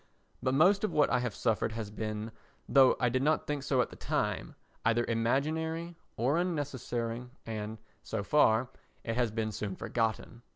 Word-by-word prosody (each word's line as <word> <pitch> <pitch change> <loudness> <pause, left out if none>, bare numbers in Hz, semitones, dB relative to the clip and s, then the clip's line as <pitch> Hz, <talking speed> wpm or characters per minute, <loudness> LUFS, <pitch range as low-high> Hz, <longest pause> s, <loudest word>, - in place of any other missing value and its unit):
—but 130 +1 +1
most 195 +7 +5
of 215 - +1
what 150 - +3
I - - +3
have 125 -4 -2
suffered 110 -1 0
has 110 -2 -5
been, 110 0 -4 0.4
though 135 -2 +6
I 125 - +3
did 130 +2 +1
not 155 +3 +2
think 150 -1 -2
so 135 -2 +2
at - - -2
the - - -10
time, - - -2 0.3
either 115 +1 +2
imaginary, 160 +9 0 0.2
or 135 +8 +2
unnecessary 125 -8 -2 0.2
and, 110 -1 -4 0.2
so 110 -2 -3
far, 125 -2 +4 0.3
it 115 - -2
has 120 -1 +2
been 110 0 -2
soon 100 -2 -4
forgotten. 115 +2 -2
120 Hz, 170 wpm, -31 LUFS, 110-145 Hz, 0.4 s, though